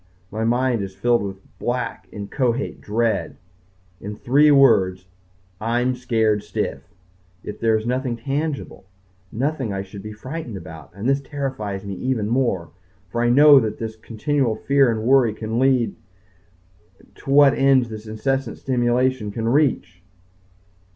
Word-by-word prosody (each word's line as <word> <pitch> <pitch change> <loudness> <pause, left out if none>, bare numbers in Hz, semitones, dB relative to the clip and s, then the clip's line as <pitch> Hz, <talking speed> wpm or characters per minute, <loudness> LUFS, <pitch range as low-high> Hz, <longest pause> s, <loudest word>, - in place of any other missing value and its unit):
My 110 +2 -3
mind 120 0 +1
is 95 -1 -6
filled 120 +1 +2
with 95 -1 -9
black, 120 -1 -3
inchoate 120 +5 -2
dread. 110 -8 -1 0.6
In 105 +2 -6
three 140 +7 +4
words, 95 -10 +4 0.5
I'm 120 +3 0
scared 110 -4 0
stiff! - - -3 0.6
Yet 105 - -7
there 110 -1 +2
is 110 - -5
nothing 125 0 -1
tangible 140 0 -4 0.5
nothing 135 -1 -2
I 95 0 -3
should 100 +1 -10
be 105 +2 -8
frightened 125 +1 -7
about, 80 -4 -10
and 100 +4 -4
this 135 +1 +2
terrifies 130 -9 -4
me 100 - -5
even 125 -3 -1
more. 115 - 0 0.4
For 120 - -1
I 120 - +2
know 145 +3 +8
where 110 -4 0
this 110 +1 -6
continual 115 +3 -1
fear 140 +3 +3
and 110 -1 -3
worry 125 -3 +4
can 110 +1 -3
lead 130 -3 +2 1.2
to - - -11
what 140 0 +6
ends 135 -3 +3
this 110 0 -8
incessant 125 +3 -2
stimulation 125 -2 0
can 115 +2 -3
reach. 115 - +1
120 Hz, 145 wpm, -22 LUFS, 105-135 Hz, 1.2 s, know